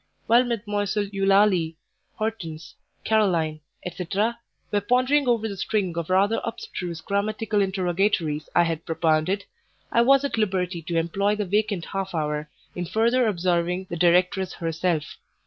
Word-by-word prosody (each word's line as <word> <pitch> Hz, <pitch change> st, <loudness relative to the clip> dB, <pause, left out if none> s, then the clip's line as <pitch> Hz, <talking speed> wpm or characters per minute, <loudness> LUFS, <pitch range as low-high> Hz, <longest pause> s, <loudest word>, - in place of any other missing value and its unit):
While 240 Hz, +2 st, +5 dB
Mdlle. 205 Hz, -3 st, -2 dB
Eulalie, 195 Hz, -4 st, +3 dB, 0.4 s
Hortense, 175 Hz, -8 st, -5 dB, 0.3 s
Caroline, 175 Hz, -8 st, +2 dB, 0.3 s
&c., 180 Hz, 0 st, -5 dB, 0.6 s
were 205 Hz, -, +1 dB
pondering 255 Hz, +6 st, +2 dB
over 230 Hz, -2 st, +2 dB
the 200 Hz, -, -5 dB
string 190 Hz, -2 st, -1 dB
of 170 Hz, 0 st, -3 dB
rather 200 Hz, +4 st, +2 dB
abstruse 175 Hz, -7 st, -5 dB
grammatical 210 Hz, +3 st, -1 dB
interrogatories 185 Hz, -4 st, 0 dB
I 175 Hz, -, +6 dB
had 165 Hz, -1 st, -2 dB
propounded, 165 Hz, +4 st, 0 dB, 0.5 s
I 235 Hz, -, +4 dB
was 275 Hz, +3 st, +5 dB
at 275 Hz, -, -2 dB
liberty 185 Hz, -4 st, -1 dB
to 165 Hz, +1 st, -3 dB
employ 195 Hz, +5 st, +1 dB
the 210 Hz, -1 st, -2 dB
vacant 205 Hz, -2 st, 0 dB
half 195 Hz, -2 st, -4 dB
hour 150 Hz, -1 st, -2 dB, 0.2 s
in 175 Hz, -, -4 dB
further 235 Hz, +5 st, +2 dB
observing 180 Hz, -1 st, 0 dB
the -, -, -2 dB
directress 180 Hz, +2 st, +2 dB
herself. 165 Hz, -2 st, -2 dB
190 Hz, 135 wpm, -24 LUFS, 170-210 Hz, 0.6 s, I